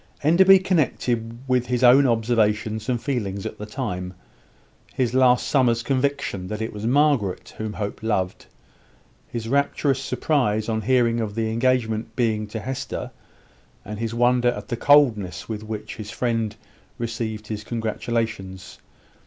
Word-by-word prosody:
Enderby 190 +5 +7
connected 125 -10 0
with 125 -1 +2
this - - -15
his 125 0 0
own 130 +3 +7
observations 110 -1 +1
and 125 -2 +1
feelings 105 -8 -3
at - - -6
the 105 - -6
time; 90 -7 -4 0.8
his 125 -2 0
last 125 -1 +4
summer's 120 -4 +2
conviction 130 -8 -1
that 105 +2 -4
it 110 +1 -4
was 105 +1 -4
Margaret 135 -8 +1
whom 110 -1 -3
Hope 100 -1 -5
loved; 95 -4 -2 0.8
his 115 -2 -5
rapturous 140 +1 +1
surprise 110 -9 0
on 110 -1 -1
hearing 120 0 +2
of 105 -2 -3
the 110 -1 -1
engagement 115 -2 0
being 110 -3 0
to 110 +2 -5
Hester; 130 +2 -5 0.7
and 105 +1 -6
his 115 0 -3
wonder 120 +1 +3
at 120 - -5
the 120 - -1
coldness 115 - +3
with 110 -2 -4
which 110 0 -6
his 105 -2 -7
friend 115 +1 -1 0.4
received 115 -2 -4
his 105 0 -5
congratulations. 110 -4 -3
115 Hz, 145 wpm, -23 LUFS, 110-125 Hz, 0.8 s, Enderby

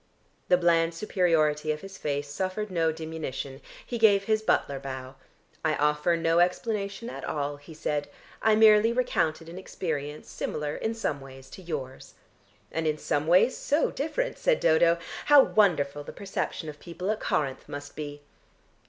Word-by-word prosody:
The 180 - +5
bland 170 -1 +2
superiority 160 -6 +1
of 150 - -4
his 195 0 -10
face 145 0 -2
suffered 190 +7 -3
no 165 -2 +2
diminution. 155 -4 -6 0.2
He 240 - -4
gave 205 -3 +5
his 215 +1 +1
butler 140 -9 +1
bow. 130 -1 -7 0.5
"I 155 -1 +2
offer 150 +3 +2
no 165 0 +2
explanation 200 +4 0
at - - -7
all," 145 -1 -2
he 150 +3 -13
said, 145 -1 -2 0.3
"I 220 -1 +4
merely 215 +1 +6
recounted 165 -10 0
an 175 +2 -8
experience 150 -6 -4
similar 150 -1 -3
in 225 +1 -2
some 150 -11 -2
ways 135 -1 -12
to - - -10
yours." 145 -7 -6 0.6
"And 160 0 -1
in 155 0 +1
some 145 0 -1
ways 185 +9 +5
so 295 +3 +1
different," - - -2
said - - +2
Dodo. 165 +1 +4 0.3
"How 290 -2 +8
wonderful 145 -9 +2
the - - -9
perception 190 -4 -4
of 150 -1 -8
people 180 +3 -4
at 215 - -2
Corinth 135 -3 -2
must 145 0 -7
be!" 145 -1 -7
165 Hz, 160 wpm, -27 LUFS, 145-200 Hz, 0.6 s, How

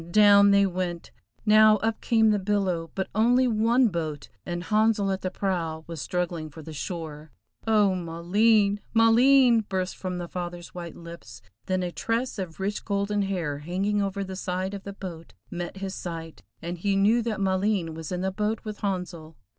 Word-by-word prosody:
down 200 +1 +6
they 200 0 +5
went! 180 -2 -3 0.3
Now 215 0 +6
up 220 +2 -2
came 220 -2 +3
the 210 - +1
billow, 185 -4 -1
but 190 - -2
only 245 +4 +3
one 230 +2 +3
boat, 155 -5 -4 0.2
and 175 0 -3
Handsel 215 -1 +2
at 190 - -2
the 185 - -2
prow 170 -5 -2
was 165 -3 -7
struggling 175 -3 -3
for 155 +1 -11
the 160 - -9
shore. 155 -1 -6 0.4
"Oh, 210 -3 +4
Maleen! 200 +5 +2 0.2
Maleen!" 240 +2 +6
burst 185 -1 -2
from 185 -1 -4
the 175 -1 -5
father's 175 -1 -6
white 170 -2 -7
lips, 170 -10 -11 0.2
then 185 -1 0
a 175 - -3
tress 230 +7 -2
of 180 -3 -6
rich 200 +2 -2
golden 200 0 -1
hair 175 -7 -2
hanging 195 +6 -1
over 200 0 -2
the 190 -1 -6
side 185 +1 -3
of 200 -1 -7
the 200 - -6
boat 175 -4 -9 0.2
met 175 +1 -5
his 190 -1 -5
sight, 165 -3 -7 0.2
and 175 +1 -5
he 200 +2 0
knew 210 +5 +3
that 225 -3 -3
Maleen 190 -3 0
was 160 0 -7
in 180 0 -2
the 190 0 -1
boat 210 +3 -2
with 210 -1 -6
Handsel. 180 -5 -4
190 Hz, 180 wpm, -26 LUFS, 170-210 Hz, 0.4 s, down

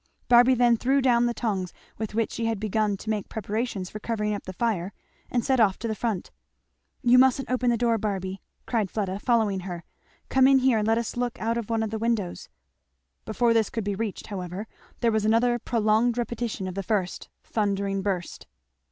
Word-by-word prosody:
Barby 245 +1 +6
then 240 -1 +4
threw 270 +4 +2
down 240 -2 +3
the 240 - -1
tongs 195 -6 -2 0.3
with 215 -1 -4
which 225 -1 0
she 230 - -3
had 225 -3 -1
begun 215 -1 0
to 215 - -8
make 210 -2 -3
preparations 215 -2 -3
for 215 - -6
covering 210 -1 -2
up 205 - -5
the 185 - -5
fire 200 -3 -1 0.4
and 240 -2 0
set 265 -2 +2
off 200 -4 +4
to 230 - -4
the 220 - -1
front. 215 -4 -3 0.7
"You 250 0 +6
mustn't 265 0 +3
open 255 -1 +1
the 235 - +2
door, 230 -1 +2
Barby," 195 -2 -3 0.2
cried 220 -5 0
Fleda, 195 -2 -2
following 220 -5 +1
her. 175 -2 -6 0.4
"Come 265 0 +4
in 270 0 +6
here 260 -3 +3
and 210 - -1
let 225 0 +3
us 235 -1 -3
look 245 -1 -2
out 230 +1 0
of 235 -2 -4
one 225 -1 +1
of 220 - -3
the 220 - -3
windows." 220 -5 -2 0.8
Before 230 +2 +2
this 225 -2 +2
could 225 - -3
be 205 0 -1
reached 210 0 -4
however, 185 0 -5 0.4
there 235 -2 +3
was 220 -1 +1
another 235 +3 +3
prolonged 230 +1 +1
repetition 235 -4 -3
of 185 - -4
the 195 - -3
first 190 -1 -2
thundering 200 -2 -1
burst. 190 -3 -3
220 Hz, 205 wpm, -26 LUFS, 200-235 Hz, 0.8 s, Barby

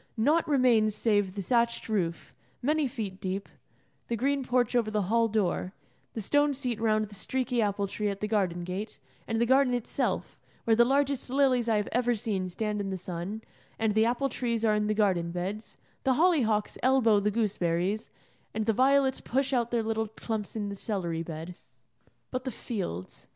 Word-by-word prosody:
Naught 305 +9 +3
remains 240 -7 +3
save 205 -4 +1
the 200 - -3
thatched 235 +3 +1
roof, 175 -7 -2 0.3
many 300 +2 +2
feet 215 -7 -5
deep, 190 +1 -3 0.6
the 235 - -1
green 275 +4 0
porch 245 -1 +1
over 230 -3 +2
the 210 -1 0
hall 230 +4 +2
door, 200 -3 -1 0.4
the 225 - -4
stone 290 +6 +2
seat 250 -5 -3
round 215 -1 +2
the 205 - -14
streaky 250 +3 -1
apple 205 -1 0
tree 205 +1 -2
at 200 -1 -4
the 210 - -2
garden 185 -5 0
gate, 190 +3 -5 0.3
and 225 0 -1
the 235 - +3
garden 260 0 +4
itself, 245 - -2 0.2
where 225 - +3
the 235 - +6
largest 275 +1 +1
lilies 255 -3 +2
I 220 - +3
have 210 - -1
ever 245 0 +2
seen 200 -4 -2
stand 210 +2 -2
in 195 - -3
the 190 - -3
sun, 180 +5 -5 0.3
and 220 -2 +1
the 220 +1 +4
apple 250 +4 +1
trees 235 -3 -1
are 215 - +4
in 210 0 +1
the 215 - +1
garden 185 -5 +2
beds, 185 +5 -5 0.3
the 265 - +3
holly 335 0 +4
hocks 215 -2 0
elbow 245 -5 +4
the 205 +1 +1
gooseberries, 200 -1 0 0.5
and 220 0 -1
the 225 - +2
violets 265 +2 +3
push 270 +2 0
out 240 -2 +1
their 235 -2 0
little 220 0 -1
clumps 220 -1 -5
in 205 -2 -2
the 200 - -5
celery 180 -6 -3
bed. 165 +1 -6 0.8
But 255 0 -3
the 260 - -2
fields. 185 - -5
220 Hz, 190 wpm, -29 LUFS, 200-245 Hz, 0.8 s, the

